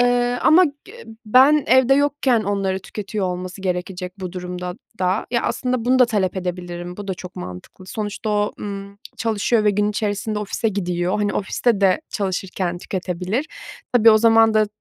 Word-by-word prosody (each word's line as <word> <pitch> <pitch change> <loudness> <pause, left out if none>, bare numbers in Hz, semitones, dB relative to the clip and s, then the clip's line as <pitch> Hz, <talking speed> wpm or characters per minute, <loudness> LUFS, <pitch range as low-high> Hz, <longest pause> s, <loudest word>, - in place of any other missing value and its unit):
eee, 245 0 +2
ama 355 +4 +6
g 290 +5 -7
ı 480 - -13 0.2
ben 265 +6 +5
evde 260 +1 +5
yokken 285 -4 +2
onları 195 -2 -1
tüketiyor 200 +1 -4
olması 180 +1 -5
gerekecek 180 0 -3
bu 185 -2 -5
durumda 180 0 -5 0.2
da. 185 +2 0
Ya, 235 -1 +1
aslında, 250 -2 -1
bunu 255 +1 +3
da 250 - +7
talep 200 -5 -1
edebilirim. 175 -1 -5
Bu 205 -1 -8
da 190 - -1
çok 180 0 -10
mantıklı. 90 - -9
Sonuçta 215 +1 -4
o, 210 0 +1
ımm, 200 0 -7 0.2
çalışıyor 225 0 +1
ve 210 - +5
gün 205 +1 +1
içerisinde 210 0 -2
ofise 210 +2 -1
gidiyor. 180 -1 -1
Hani, 205 -1 0
ofiste 210 +2 0
de 195 +7 +3
çalışırken 185 -2 -2
tüketebilir. 185 - -3 0.5
Tabii, 230 -2 +7
o 215 - +6
zaman 225 0 +5
da, 215 0 +4
205 Hz, 170 wpm, -21 LUFS, 185-230 Hz, 0.5 s, da